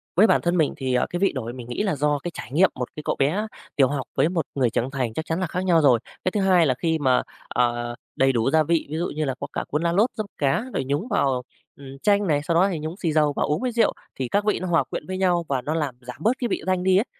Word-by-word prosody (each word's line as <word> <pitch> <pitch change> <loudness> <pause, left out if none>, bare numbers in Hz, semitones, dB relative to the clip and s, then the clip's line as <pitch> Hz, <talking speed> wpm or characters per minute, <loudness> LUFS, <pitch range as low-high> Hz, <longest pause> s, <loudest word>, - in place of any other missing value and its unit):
Với 210 +5 +6
bản - - +3
thân 175 +1 +1
mình 155 -3 +2
thì, 130 -2 -2
ờ, 125 - +2
cái 175 - -3
vị 195 - +3
đổi 120 -4 -5
mà - - -10
mình 120 -2 -8
nghĩ 125 - -2
là 195 -6 0
do 145 +1 +1
cái 175 - -3
trải - - -8
nghiệm, 175 +7 +4
một 125 -1 -5
cái 150 - -7
cậu - - -1
bé 185 +11 +1 0.3
tiểu 135 -3 +5
học 140 -1 -3
với 155 - +3
một 170 -4 -1
người 130 -4 +2
trưởng 120 +4 -1
thành 130 -5 -2
chắc 160 - -4
chắn 165 +2 -2
là 185 - -1
khác 180 +3 -3
nhau 170 -3 +4
rồi. 130 -6 +5 0.2
Cái 185 - +1
thứ 205 - 0
2 185 -3 +4
là 135 - +3
khi 160 +5 -1
mà, 130 -3 +3 0.3
ờ, 120 -1 0 0.2
đầy 135 0 +3
đủ 120 0 +1
gia 155 +1 +4
vị, 165 +1 0
ví 155 - -3
dụ 175 - -1
như 155 0 0
là 135 -2 -2
có 140 - -4
cả - - -2
cuốn 150 +2 -1
lá 170 - +2
lốt, 210 +8 +3
dấp 215 - -3
cá 140 +8 +1
rồi - - -1
nhúng 145 - -1
vào, 135 - +1 0.3
ừm, 140 - -12 0.2
chanh 205 -1 +3
này, 145 -3 +2
sau 165 +2 0
đó 180 +3 +5
thì 165 - -3
nhúng 160 +4 -5
xì 170 -6 -1
dầu 150 -2 +3
và - - +1
uống 150 - 0
với 255 -1 -1
rượu, 230 -1 +2 0.3
thì 130 - -1
các 205 +11 0
vị 210 - +1
nó 185 - -4
hòa 170 -2 +3
quyện - - -6
với 185 0 -3
nhau 175 -3 +2
và 135 -2 0
nó 150 - -2
làm 150 -6 -2
giảm 125 -1 -9
bớt 230 +10 +1
cái 245 - 0
vị - - -2
tanh 185 -1 0
đi 190 0 +4
ấy, 210 - +2
155 Hz, 315 wpm, -24 LUFS, 135-185 Hz, 0.3 s, Với